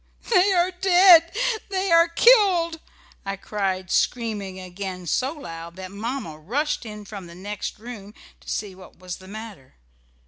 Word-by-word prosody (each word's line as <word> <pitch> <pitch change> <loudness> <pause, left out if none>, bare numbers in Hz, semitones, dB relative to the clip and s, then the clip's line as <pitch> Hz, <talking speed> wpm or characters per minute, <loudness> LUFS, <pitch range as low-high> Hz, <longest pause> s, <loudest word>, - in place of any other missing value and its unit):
"They 390 -1 +5
are 360 0 +2
dead, 360 -2 +6 0.4
they 385 -1 -1
are 335 0 +6
killed!" 350 -4 +4 0.4
I 195 0 -3
cried 190 -2 -3
screaming 210 -6 -1
again 185 0 -7
so 255 - 0
loud 170 - -9
that 185 0 -8
Mamma 210 - -5
rushed 250 - -2
in 210 -1 -9
from 195 -3 -9
the 170 - -12
next 205 +3 -6
room 215 -2 -10 0.2
to - - -13
see 205 -3 -3
what 185 0 -15
was 180 0 -7
the 185 - -15
matter. 205 - -10
210 Hz, 150 wpm, -24 LUFS, -, 0.4 s, dead